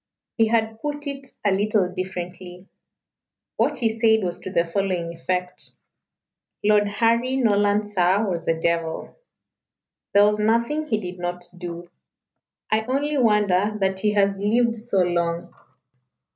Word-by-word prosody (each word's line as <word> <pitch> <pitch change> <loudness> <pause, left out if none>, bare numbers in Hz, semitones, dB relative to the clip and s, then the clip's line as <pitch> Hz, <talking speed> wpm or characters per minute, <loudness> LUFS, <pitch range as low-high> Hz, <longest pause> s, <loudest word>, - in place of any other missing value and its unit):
He 225 -2 +3
had 220 -1 0
put 295 0 -4
it 275 -1 -5 0.2
a 205 - +4
little 205 0 +2
differently. 180 0 -6 0.9
What - - +1
he 230 -3 +2
said 220 -1 +3
was 175 -1 -3
to - - -7
the 170 -2 +1
following 175 -1 -2
effect 180 +2 -3 0.9
"Lord 210 0 +4
Harry 230 +5 +1
Norland, 205 -4 +2
sir, 195 +1 +2
was 175 -3 -3
a 165 0 +1
devil. 165 -1 -2 1.0
There 205 0 +7
was 210 0 +1
nothing 235 +8 +1
he 220 -7 +1
did 180 -2 -7
not 175 0 -4
do. 175 -1 -8 0.8
I 215 0 +3
only 285 +3 0
wonder 210 -3 +2
that 190 -1 0
he 210 +1 +1
has 200 -1 +2
lived 230 +3 +2
so 215 -4 0
long. 170 -1 -1
205 Hz, 140 wpm, -23 LUFS, 180-225 Hz, 1.0 s, There